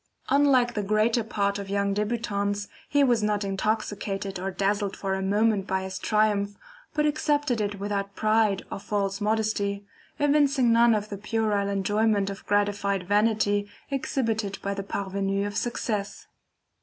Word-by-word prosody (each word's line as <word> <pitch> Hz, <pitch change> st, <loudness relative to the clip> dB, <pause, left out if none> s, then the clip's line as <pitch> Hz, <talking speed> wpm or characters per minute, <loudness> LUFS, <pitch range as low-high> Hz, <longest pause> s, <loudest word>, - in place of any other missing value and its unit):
Unlike 270 Hz, -4 st, +4 dB
the 210 Hz, -, -1 dB
greater 215 Hz, +3 st, +2 dB
part 200 Hz, -2 st, -1 dB
of 200 Hz, -1 st, -6 dB
young 200 Hz, 0 st, 0 dB
debutants, 205 Hz, -1 st, -1 dB, 0.2 s
he 285 Hz, 0 st, +4 dB
was 240 Hz, -4 st, +3 dB
not 210 Hz, -1 st, 0 dB
intoxicated 200 Hz, -1 st, -2 dB
or 190 Hz, +1 st, -2 dB
dazzled 200 Hz, +1 st, -1 dB
for 195 Hz, -1 st, -2 dB
a 190 Hz, -, -1 dB
moment 205 Hz, 0 st, +1 dB
by 190 Hz, 0 st, -1 dB
his 190 Hz, 0 st, -5 dB
triumph, 205 Hz, -2 st, +1 dB, 0.4 s
but 300 Hz, -1 st, +2 dB
accepted 290 Hz, -5 st, +1 dB
it 205 Hz, -1 st, -2 dB
without 200 Hz, -1 st, -3 dB
pride 215 Hz, -2 st, +2 dB
or -, -, -4 dB
false 200 Hz, -1 st, -2 dB
modesty, 210 Hz, -2 st, 0 dB, 0.3 s
evincing 285 Hz, -4 st, +3 dB
none 230 Hz, 0 st, +5 dB
of 210 Hz, 0 st, -3 dB
the 200 Hz, -, -6 dB
puerile 210 Hz, -2 st, 0 dB
enjoyment 200 Hz, +1 st, +1 dB
of 195 Hz, -, -9 dB
gratified 200 Hz, -2 st, 0 dB
vanity 205 Hz, 0 st, +2 dB, 0.2 s
exhibited 225 Hz, -7 st, -1 dB
by 200 Hz, -, -1 dB
the 200 Hz, -, -4 dB
PARVENUS 195 Hz, 0 st, -2 dB
of 205 Hz, 0 st, -4 dB
success. 210 Hz, -4 st, -3 dB
205 Hz, 150 wpm, -26 LUFS, 200-225 Hz, 0.4 s, none